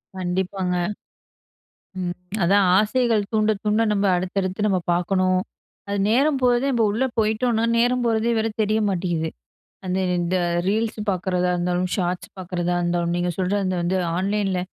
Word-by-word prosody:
கண்டிப்பாங்க. 185 Hz, 0 st, -2 dB, 1.7 s
அதான் 195 Hz, +2 st, +4 dB
ஆசைகள் 220 Hz, 0 st, +2 dB
தூண்ட 215 Hz, 0 st, +3 dB
தூண்ட, 215 Hz, +1 st, +2 dB
நம்ம 200 Hz, 0 st, +1 dB
அடுத்தடுத்து 185 Hz, +2 st, -2 dB
நம்ம 190 Hz, -2 st, +2 dB
பாக்கணும். 185 Hz, +1 st, +1 dB, 0.5 s
அது 200 Hz, -, -1 dB
நேரம் 275 Hz, +3 st, +3 dB
போறதே, 245 Hz, +1 st, +3 dB
நம்ப 230 Hz, -2 st, +2 dB
உள்ள 230 Hz, +6 st, 0 dB, 0.2 s
போயிட்டோம்ன்னா, 225 Hz, +1 st, +1 dB
நேரம் 245 Hz, +1 st, +2 dB
போறதே 225 Hz, +1 st, +1 dB
வேற 220 Hz, -, 0 dB
தெரிய 215 Hz, +1 st, +1 dB
மாட்டேங்குது. 170 Hz, -3 st, -1 dB, 0.6 s
அந்த 185 Hz, +1 st, -1 dB, 0.2 s
இந்த 175 Hz, +2 st, 0 dB, 0.3 s
ரீல்ஸ் 220 Hz, +1 st, 0 dB
பாக்குறதா 180 Hz, -1 st, 0 dB
இருந்தாலும், 180 Hz, +1 st, 0 dB
ஷார்ட்ஸ் 180 Hz, -1 st, -2 dB
பாக்குறதா 175 Hz, -1 st, -2 dB
இருந்தாலும், 175 Hz, 0 st, 0 dB
நீங்க 175 Hz, 0 st, 0 dB
சொல்ற 185 Hz, +2 st, 0 dB
அந்த 185 Hz, -, -1 dB
வந்து 180 Hz, +2 st, 0 dB, 0.2 s
ஆன்லைன்ல 195 Hz, 0 st, 0 dB
190 Hz, 135 wpm, -23 LUFS, 180-220 Hz, 1.7 s, அதான்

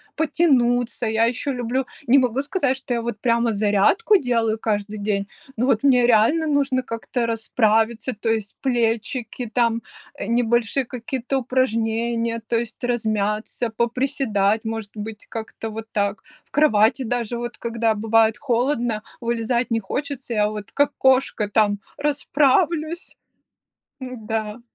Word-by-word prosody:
потянуться. 250 Hz, -7 st, +2 dB
Я 220 Hz, +1 st, +2 dB
еще 250 Hz, +4 st, -1 dB
люблю 250 Hz, +2 st, -1 dB, 0.2 s
не 265 Hz, +4 st, +6 dB
могу 255 Hz, 0 st, +2 dB
сказать, 285 Hz, -3 st, 0 dB
что 260 Hz, -2 st, -4 dB
я 235 Hz, -, 0 dB
вот 230 Hz, -3 st, -5 dB
прямо 235 Hz, -1 st, +2 dB
зарядку 210 Hz, -, +3 dB
делаю 230 Hz, -6 st, 0 dB
каждый 210 Hz, -1 st, -2 dB
день, 200 Hz, -1 st, -1 dB, 0.3 s
но 240 Hz, +3 st, 0 dB
вот 250 Hz, -2 st, +2 dB
мне 250 Hz, -3 st, +5 dB
реально 245 Hz, +8 st, +4 dB
нужно 275 Hz, -3 st, +1 dB
как-то 235 Hz, +1 st, -3 dB
расправиться, 225 Hz, +1 st, +1 dB
то 215 Hz, +2 st, -3 dB
есть 220 Hz, -2 st, -1 dB
плечики, 240 Hz, -1 st, -1 dB
там, 230 Hz, -1 st, +1 dB, 0.3 s
э, -, -, -5 dB
небольшие 235 Hz, +2 st, +1 dB
какие-то 255 Hz, +2 st, -3 dB
упражнения, 230 Hz, -2 st, 0 dB
то 230 Hz, -, 0 dB
есть 235 Hz, +1 st, -6 dB
размяться, 220 Hz, -1 st, -1 dB
поприседать, 230 Hz, -3 st, 0 dB
может 220 Hz, -2 st, -4 dB
быть, 215 Hz, 0 st, -7 dB
как-то 225 Hz, 0 st, -6 dB
вот 220 Hz, 0 st, -6 dB
так. 200 Hz, -1 st, 0 dB, 0.2 s
В -, -, -28 dB
кровати 235 Hz, -3 st, +3 dB
даже 240 Hz, -1 st, -2 dB
вот, 240 Hz, 0 st, -5 dB
когда 230 Hz, -1 st, 0 dB
бывает 225 Hz, +1 st, +3 dB
холодно, 240 Hz, -4 st, 0 dB, 0.2 s
вылезать 235 Hz, +1 st, -1 dB
не 225 Hz, -, +2 dB
хочется, 265 Hz, +3 st, -4 dB
я 210 Hz, -1 st, +2 dB
вот, 210 Hz, -1 st, -7 dB
как 285 Hz, 0 st, +2 dB
кошка, 260 Hz, -5 st, +2 dB
там 205 Hz, -2 st, +2 dB, 0.2 s
расправлюсь. 300 Hz, +3 st, +1 dB, 0.8 s
Н-да. 225 Hz, -3 st, -4 dB
235 Hz, 135 wpm, -22 LUFS, 220-255 Hz, 0.8 s, не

